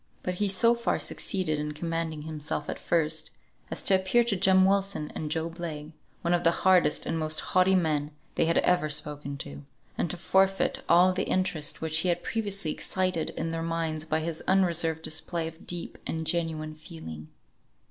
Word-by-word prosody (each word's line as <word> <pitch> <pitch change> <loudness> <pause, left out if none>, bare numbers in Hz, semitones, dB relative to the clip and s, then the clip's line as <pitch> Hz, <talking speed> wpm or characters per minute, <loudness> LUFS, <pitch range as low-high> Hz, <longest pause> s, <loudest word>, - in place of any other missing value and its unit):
But 180 - -1
he 205 - +4
so 200 +5 +5
far 235 0 0
succeeded 170 -6 -1
in 150 0 -3
commanding 165 -1 -3
himself 155 -1 -4
at - - -7
first, 160 -2 0 0.4
as - - -2
to - - +4
appear 190 +6 +3
to 230 -3 +1
Jem 190 0 +5
Wilson 195 -5 +1
and 155 - -4
Job 165 +2 -3
Legh 155 -3 -5 0.3
one 170 0 +1
of 175 - +1
the 170 - +6 0.2
hardest 180 -5 +4
and 165 - -1
most 155 0 +1
haughty 185 +1 +3
men 155 -5 +1 0.2
they - - +2
had 165 - +2
ever 175 -4 +2
spoken 145 -1 -4
to, 70 - -7 0.4
and 175 - 0
to 180 - -3
forfeit 190 +2 +2
all 180 +2 +6
the 185 - -1
interest 175 -6 0
which 160 0 +1
he 180 - +1
had 175 0 0
previously 200 -7 -2
excited 185 -2 0
in 165 0 -2
their 165 0 -3
minds 165 -2 -2
by 160 0 -1
his 165 0 -3
unreserved 170 -4 +2
display 160 +1 -1
of 160 +1 -11
deep 175 -1 -4
and 160 0 -3
genuine 160 -2 -1
feeling. 155 - -9
165 Hz, 185 wpm, -28 LUFS, 155-185 Hz, 0.4 s, the